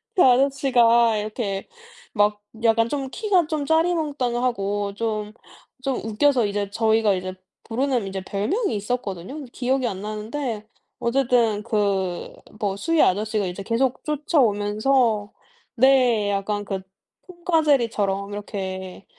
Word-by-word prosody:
그 365 - +5
아저씨가 245 -4 +4
이렇게 210 -2 -3 0.5
막 210 -1 +2 0.2
약간 230 0 +4
좀 270 0 -3
키가 375 -3 +1
좀 305 -3 -2
짜리몽땅하고 250 - 0
좀 215 -1 -3 0.5
좀 270 -2 0
웃겨서 235 +1 +2
이제 200 0 -2
저희가 220 -1 +2
이제 185 0 -3 0.3
부르는 245 -2 -1
이제 190 0 -4
별명이 225 - -1
있었거든요. 205 - -4
근데 275 -5 -8
기억이 260 +1 0
안 190 -3 -4
나는데 215 +1 -4 0.3
어쨌든 235 -4 +2
그 200 -5 -1 0.3
뭐 200 -2 -1
수위 330 +9 +1
아저씨가 210 +1 +1
이제 180 +2 -5
계속 240 +5 0
쫓아오면서 230 -6 +1 0.4
네 245 -5 +4
약간 205 +1 -2
그 195 -1 -3 0.5
톰과 345 -2 0
제리처럼 210 -8 +1
이렇게 190 -2 -6
225 Hz, 275 characters per minute, -23 LUFS, 205-265 Hz, 0.5 s, 그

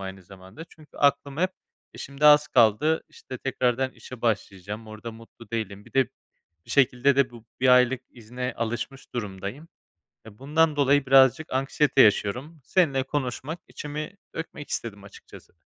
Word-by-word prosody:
aynı 95 0 -7
zamanda. 95 - -12
Çünkü 155 -2 -19
aklım 140 -1 +1
hep, 185 +3 +1 0.4
eee, - - -12
şimdi 140 +2 0
az 150 0 +7
kaldı, 125 +7 +3
işte, 130 - -10
tekrardan 130 0 0
işe 130 -2 -12
başlayacağım. 105 -1 -3
Orada 110 +2 -8
mutlu 115 0 -15
değilim. 105 -3 -4
Bir - - -18
de, 135 -2 +3 0.6
bir - - -12
şekilde 135 0 +3
de 140 -2 +3
bu 120 -2 -14 0.2
1 130 - +3
aylık 125 0 +5
izine 125 +2 -6
alışmış 120 +4 -5
durumdayım. 105 - -6 0.6
Eee, 110 -2 -13
bundan 155 +3 +2
dolayı 140 -1 +3
birazcık 135 +3 +5
anksiyete 135 +1 +2
yaşıyorum. 125 +9 +2
Seninle 140 -4 +2
konuşmak, 140 +3 -4
içimi 150 +6 -7 0.2
dökmek 155 -2 -7
istedim 100 -4 -4
açıkçası. 100 - -15
130 Hz, 150 wpm, -25 LUFS, 110-145 Hz, 0.6 s, az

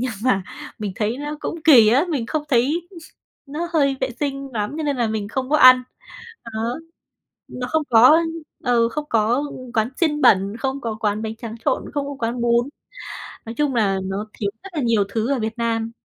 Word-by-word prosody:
nhưng 255 0 -1
mà 200 -7 +2 0.4
mình 205 -3 -4
thấy 220 +3 -1
nó 295 +1 -5
cũng 335 - -4
kỳ 245 -9 +8
á, 265 +9 +4
mình 275 -9 -2
không 310 +4 -2
thấy 290 +7 +1 0.6
nó 315 +5 -4
hơi 280 -4 +2
vệ 260 -1 -1
sinh 275 -1 -3
lắm, 210 +4 -3
cho 320 - -3
nên 290 -2 -1
là 240 -2 +1
mình 215 -2 -3
không 260 +4 -3
có 305 - +4
ăn. 255 -2 +8 0.6
Đó. 230 +1 -3 0.7
Nó 250 0 -5
không 315 0 +1
có, 225 -2 +6
ơ, 315 - +7 0.5
ờ, 235 -2 +3
không 300 +5 -4
có 230 +5 +2 0.3
quán 220 0 +2
xiên 300 -3 +1
bẩn, 195 +3 +4
không 270 +2 -3
có 225 -3 -4
quán 210 0 0
bánh 220 0 -4
tráng 230 -1 -7
trộn, 275 - 0
không 285 -1 -1
có 285 -1 -6
quán 235 +1 -2
bún. 235 +2 +2 0.8
Nói 225 - -6
chung 290 -3 0
là 195 -4 +2
nó 195 +2 -3
thiếu 200 -2 -2
rất 390 - -9
là 300 - -2
nhiều 230 -4 +2
thứ 225 +5 -1
ở 270 - -1
Việt 220 +1 -3
Nam. 230 -1 -1
240 Hz, 210 wpm, -21 LUFS, 225-280 Hz, 0.8 s, kỳ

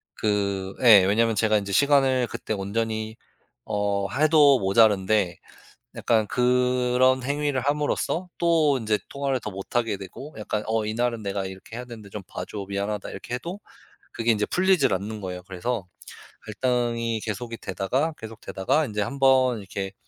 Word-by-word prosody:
그 100 -2 -1
예 105 -6 +9
왜냐하면 110 +2 +2
제가 110 -1 +3
인제 100 -1 -4
시간을 135 0 +3
그때 110 - -5
온전히 110 +2 -3 0.5
어 100 -1 -1
해도 145 -2 +5
모자란데 100 -2 +3 0.6
약간 110 -3 +1
그런 125 +1 +2
행위를 145 -1 -1
함으로써 150 +5 -1
또 160 -5 +3
인제 110 -3 0
통화를 140 -2 -1
더 105 - -5
못하게 105 +3 -2
되고 115 +10 -10
약간 105 0 -3
"어. 110 -1 0
이날은 115 0 -1
내가 100 -1 -2
이렇게 95 +5 -9
해야 125 - -6
되는데 110 -4 -11
좀 105 0 -7
봐 - - -6
줘. 100 -2 -6
미안하다." 100 +1 -3
이렇게 120 - -6
해도 175 +10 -6 0.5
그게 115 0 +1
인제 105 -1 +1
풀리질 190 - +3
않는 105 +3 -3
거예요. 90 -1 -6
그래서 95 +3 -3 0.6
갈등이 115 -1 -1
계속이 115 +2 -5
되다가 130 - -1
계속되다가 110 +6 -2
인제 105 -3 -3
1 140 +7 -3
번 130 -3 +4
이렇게 95 0 -6
115 Hz, 330 characters per minute, -25 LUFS, 100-130 Hz, 0.6 s, 예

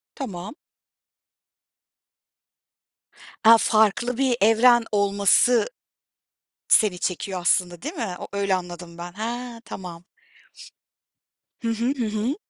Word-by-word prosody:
Tamam. 210 - -7 2.9
A, 230 +1 +8
farklı 220 +3 +1
bir 260 -3 +1
evren 230 +2 +5
olması, 205 - +3 1.0
seni 200 -5 +3
çekiyor 185 +1 -3
aslında 175 0 0
değil 305 +7 -5
mi? 220 - -4
O - - -7
öyle 200 -1 0
anladım 175 -1 -7
ben. 175 0 -7
He, 235 +3 -5
tamam! 175 -5 -9 1.6
Hı 230 - -2
hı, 230 +1 -2
hı 235 - -1
hı. 220 +6 -2
215 Hz, 100 wpm, -23 LUFS, 180-235 Hz, 2.9 s, A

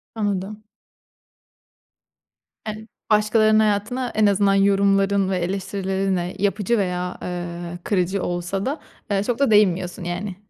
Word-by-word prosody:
Anladım. 205 0 -3 2.0
Evet. 215 +1 -6 0.2
Başkalarının 215 0 +4
hayatına 215 +4 0
en 215 0 +4
azından 200 0 +3
yorumların 195 0 +3
ve 190 - 0
eleştirilerinle 190 0 -2
yapıcı 205 +3 +1
veya, 180 -2 -2
eee, 175 -1 -5
kırıcı 190 -1 0
olsa 175 +2 -2
da, 285 +4 -2 0.3
eee, 195 0 +1
çok 240 +3 -2
da 280 -5 +3
değinmiyorsun 185 -4 +2
yani. 180 +3 -4
195 Hz, 115 wpm, -22 LUFS, 180-210 Hz, 2.0 s, Başkalarının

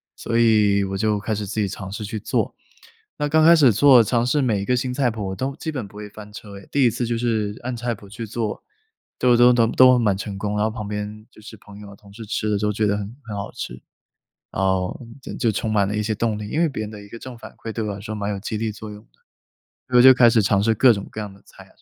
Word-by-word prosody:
所 115 0 -2
以 105 -3 +4
我 95 0 -4
就 105 0 0
开 110 +2 -3
始 105 0 -4
自 105 - -4
己 100 - 0
尝 95 0 -7
试 105 +2 -5
去 110 +1 -5
做。 - - -2 0.6
那 150 0 -1
刚 155 +1 +4
开 170 +1 +8
始 140 -6 +5
做， 130 +1 +6
尝 120 +2 0
试 135 +4 +1
每 110 -7 0
一 - - -4
个 125 - +1
新 125 +1 -2
菜 125 -3 +1
谱 100 -4 -5
都 135 +7 -3
基 160 - -4
本 130 -9 -5
不 100 - -19
会 105 0 -8
翻 105 0 -12
车 100 -2 -10
哎， 100 - -17
第 140 - +2
1 - - +5
次 120 +2 -3
就 115 0 -1
是 110 -3 -1
按 125 0 -3
菜 120 0 -2
谱 100 - -15
去 115 +2 -7
做， 110 -1 -4 0.6
都 125 -1 +4
都 125 +1 +6
都 115 -2 +3
都 125 +1 +5
蛮 105 -4 +2
成 100 0 -6
功， 105 +1 -3
然 105 - +1
后 - - +1
旁 110 -2 -6
边 105 +1 -6
就 - - -17
是 110 +1 -11
朋 105 0 -14
友 105 -1 -11
啊、 - - -12
同 100 0 -18
事 115 +2 -9
吃 110 0 -2
着 105 - +1
都 105 0 0
觉 110 +1 0
得 100 - +1
很 105 +3 -6
很 110 -3 -7
好 100 0 -5
吃， - - -6 0.8
然 95 - -2
后 95 -1 0 0.2
就 - - -8
就 115 -4 0
充 110 +2 -2
满 100 -2 +2
了 105 - -3
一 105 - 0
些 110 +1 -1
动 110 0 -1
力， 105 -1 -6
因 150 - -1
为 170 - +3
别 130 -6 -5
人 105 - -6
的 105 -1 -10
一 100 - -14
个 115 - -10
正 130 -1 -9
反 - - -11
馈 110 - -7
对 110 - -3
我 105 - -3
来 100 - -9
说， 110 +1 -6
蛮 105 -1 -3
有 100 - -3
激 110 +2 -4
励 110 0 -2
作 105 +1 -9
用 105 0 -11
的， - - -41 0.6
我 - - +8
就 130 +1 +10
开 125 -1 +6
始 115 -2 +3
尝 100 0 +2
试 110 +1 +2
各 125 +2 +6
种 100 -2 -5
各 110 - -6
样 105 -1 -7
的 100 - -19
菜 - - -16
啊 - - -24
什 - - -30
110 Hz, 315 characters per minute, -22 LUFS, 100-120 Hz, 0.8 s, 就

